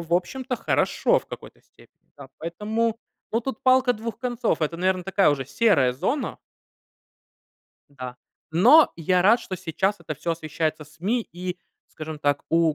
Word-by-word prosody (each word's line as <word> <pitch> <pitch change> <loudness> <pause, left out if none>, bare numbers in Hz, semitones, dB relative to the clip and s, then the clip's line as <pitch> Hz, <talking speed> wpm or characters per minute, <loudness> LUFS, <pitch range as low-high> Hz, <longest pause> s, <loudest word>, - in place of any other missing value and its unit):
в 170 0 -7
общем-то, 250 +8 -2
хорошо - - +2
в - - -16
какой-то - - -10
степени. - - -24
Да, 140 -2 -11
поэтому, 215 +7 -2 0.3
ну, 230 - +1
тут 260 -1 -5
палка 255 -1 +4
двух 225 +1 -6
концов. 240 -9 -1
Это, 160 +2 -1
наверно, 185 0 0
такая 195 -4 +3
уже, 135 -2 -1
серая 140 - +3
зона. 270 - -2 1.5
Да, 125 -3 -8 0.4
но 250 - +6
я 180 +2 +2
рад, 225 +5 +5
что 185 - -6
сейчас 190 +4 -1
это 160 -2 -5
всё 165 +4 -2
освещается 155 -1 -3
СМИ 190 +11 -2
и, 180 +1 -5 0.3
скажем 155 -1 -7
так, 145 -1 0
у 165 -2 +3
180 Hz, 155 wpm, -24 LUFS, 155-230 Hz, 1.5 s, но